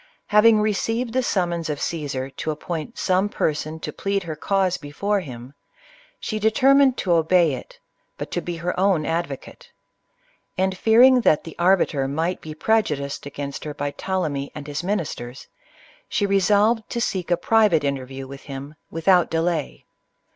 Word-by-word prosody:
Having 210 0 +6
deceived 225 +3 -1
the 260 - +2
summons 175 -8 -1
of 145 -1 -3
Caesar 140 -5 -3
to 155 - -3
ap 150 - -7
point 170 +6 -5
some 190 +2 +1
person 155 -2 -2
to - - -5
plead 195 -1 -1
her 160 -2 -5
cause 190 +3 0
before 200 +8 -2
him, 125 -5 -9 0.7
she 215 - -3
determined 265 +4 +4
to 185 - -1
obey 165 -1 +4
it, 130 - -8 0.4
but - - -6
to - - -1
be 175 - -4
her 170 +2 -2
own 190 -5 +2
advocate; 165 -4 -4 0.9
and 190 0 +1
fearing 245 +6 +6
that 155 -9 +3
the 165 - -10
arbiter 170 -6 +2
might 165 +6 -2
be 155 -1 -8
prejudiced 150 -9 0
against 140 0 -6
her 150 -1 -6
by 145 0 -3
Ptolemy 150 -7 -3
and 150 -2 -7
his 145 +3 -4
ministers, 160 -10 -4 0.6
she 205 - 0
re 200 0 +3
solved 210 +4 +2
to 235 - -3
seek 185 -6 -2
a 175 - +3
private 210 -5 +3
interview 135 -1 -3
with 135 0 -10
him, 140 +1 -7 0.2
without 175 +2 +3
delay. 165 -2 -2
170 Hz, 160 wpm, -23 LUFS, 145-200 Hz, 0.9 s, Having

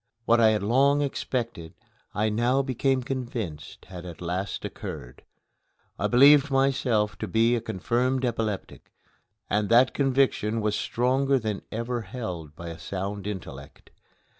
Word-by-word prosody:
What 115 0 +4
I 110 -1 +6
had 105 -2 0
long 140 +6 +3
expected 120 - -4 0.4
I 105 +2 +1
now 120 +5 +1
became 130 0 0
convinced 120 - -5
had 90 -2 -9
at 85 -2 -9
last 90 +3 -3
occurred. - - -8 0.8
I - - +1
believed 140 +3 +6
myself 135 -6 +1
to - - -3
be 115 +2 +3
a 115 - -2
confirmed 125 +5 -1
epileptic, 110 -4 -4 0.6
and 105 0 0
that 120 +3 +5
conviction 135 -5 +1
was 105 -1 0
stronger 135 +3 +1
than 110 -4 -3
any 110 - -4
ever 120 0 -3
held 90 - -6
by 85 +1 -7
a 85 0 -8
sound 100 +2 -5
intellect. 95 -6 -8
115 Hz, 140 wpm, -26 LUFS, 100-130 Hz, 0.8 s, I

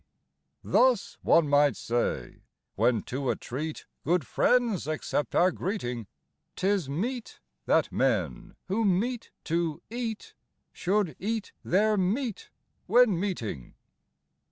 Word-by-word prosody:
Thus, 250 -4 +2
one 165 -3 +4
might 145 -3 +4
say, 120 +1 -2 0.3
when 120 -4 +2
to 135 0 -3
a - - +2
treat 150 +5 -5 0.2
good 170 -3 +1
friends 235 - +2
accept 155 -1 -2
our 185 +1 +5
greeting, 125 - -3 0.5
'Tis 190 -6 0
meet 230 - -3 0.3
that - - +3
men - - 0
who 205 +5 0
meet 220 +5 0
to 165 -2 -1
eat 230 -2 -4 0.4
should 190 -5 0
eat 220 +2 -2
their 210 +3 +3
meat 205 +3 -1 0.4
when 220 -4 +5
meeting. 120 - -4
185 Hz, 110 wpm, -28 LUFS, 145-220 Hz, 0.5 s, our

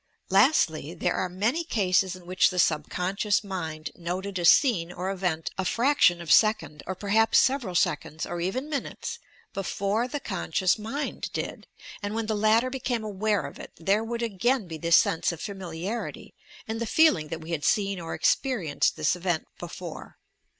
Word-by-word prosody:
Lastly, 175 - +3
there - - 0
are 185 - -1
many 220 - 0
cases 190 - +1
in 180 -1 -14
which 185 +1 +3
the 185 - -6
subconscious 180 +6 +1
mind 160 -6 -5
noted 185 +3 -4
a 175 - -1
scene 175 - +4
or 180 +2 -3
event 180 -4 -2
a - - +1
fraction 230 -4 +3
of 160 - -3
second, 215 -9 +3
or 190 - -3
perhaps 215 +3 +3
several 255 -9 +2
seconds, 155 -1 0
or 175 0 -4
even 225 - -2
minutes, 310 - -4 0.3
before 200 +4 -1
the 290 +3 -4
conscious 190 - 0
mind 270 +7 -4
did; - - -5 0.3
and 205 +1 -3
when 225 0 -1
the 220 - -1
latter 220 +4 +3
became 250 -3 -2
aware 210 0 0
of - - -9
it, - - -10
there 195 +6 +1
would 235 +1 -3
again 230 +1 0
be 160 -2 -7
this 170 +1 +5
sense 165 - +2
of 170 - -8
"familiarity," 190 +3 -5 0.3
and 225 +1 -4
the 230 - -1
feeling 260 - +4
that 165 +1 -6
we 160 +2 -8
bad 155 -3 -2
seen 200 +5 +1
or 165 -1 -5
experienced 210 - +1
this 155 +2 +1
event 175 -2 -1
before. - - -8
195 Hz, 170 wpm, -27 LUFS, 175-225 Hz, 0.3 s, this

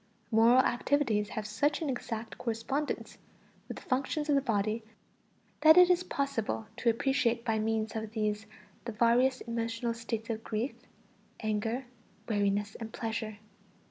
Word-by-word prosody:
Moral 230 +3 +6
activities 240 -4 +1
have 215 - -4
such 285 +8 +1
an 320 - -2
exact 230 -4 -4
correspondence 255 +6 -3 0.5
with - - -6
the - - -10
functions 280 +4 -1
of - - +4
the 275 - +4
body 220 -2 0 0.8
that 315 +2 +8
it 360 0 +8
is 360 0 +3
possible 275 - -2
to 245 - +2
appreciate 235 -1 +1
by 220 -2 +1
means 220 0 -1
of 220 -1 -3
these 215 -1 -1 0.4
the 235 - -3
various 245 +4 +3
emotional 230 0 -2
states 230 -1 -4
of 225 0 -4
grief, 230 +5 -2 0.7
anger, 225 +4 -1 0.4
weariness, 205 -1 0
and 225 -1 -6
pleasure. 220 -2 -4
230 Hz, 140 wpm, -31 LUFS, 220-260 Hz, 0.8 s, that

